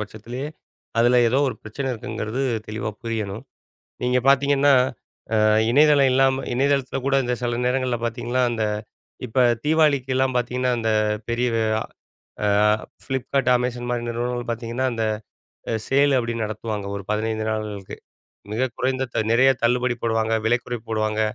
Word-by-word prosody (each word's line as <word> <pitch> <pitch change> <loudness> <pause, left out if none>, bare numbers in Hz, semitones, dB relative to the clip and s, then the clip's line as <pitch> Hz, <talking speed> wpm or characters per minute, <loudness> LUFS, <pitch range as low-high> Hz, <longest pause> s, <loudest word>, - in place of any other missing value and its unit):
பட்சத்திலேயே, 120 +6 -6 0.5
அதில 120 +1 +5
ஏதோ 130 +4 +2
ஒரு - - -4
பிரச்சனை 135 +5 -4
இருக்குங்கிறது 110 +2 -4 0.3
தெளிவா 110 0 -3
புரியணும். 110 0 -4 0.6
நீங்க 125 0 +2
பார்த்தீங்கன்னா 140 +1 +4 0.7
அ - - +3 0.3
இணையதளம் 145 -1 +5
இல்லாம 135 0 +2
இணையதளத்தில 135 0 +1
கூட 140 - +2
இந்த 125 0 0
சில 120 -1 -1
நேரங்கள்ல 125 -1 0
பார்த்தீங்கன்னா, 120 +2 -1
அந்த 115 -2 -1 0.6
இப்ப 115 +3 -1 0.3
தீபாவளிக்கெல்லாம் 135 -4 +2
பார்த்தீங்கன்னா 125 +1 0
அந்த 110 - 0 0.4
பெரிய, 120 +1 +1 1.0
அ - - +3 0.6
Flipkart, 135 0 -1
Amazon 120 0 -3
மாரி 120 -1 -1
நிறுவனங்கள் 120 +1 -3
பார்த்தீங்கன்னா, 115 +2 -3
அந்த 115 -1 -2 0.7
அ - - 0
சேல் 140 +1 +3
அப்பிடின்னு 115 -2 -2
நடத்துவாங்க 105 -1 -4
ஒரு 100 - -6
15 110 +1 -1
நாள்களுக்கு. 105 -3 -5 0.6
மிக 125 +5 0
குறைந்த 130 0 0
த - - +2
நெறைய 130 +3 +5
தள்ளுபடி 125 +1 +2
போடுவாங்க. 115 -1 0
விலைக்குறைப்பு 120 0 -1
போடுவாங்க. 110 -1 0
120 Hz, 130 wpm, -23 LUFS, 115-130 Hz, 1.0 s, அதில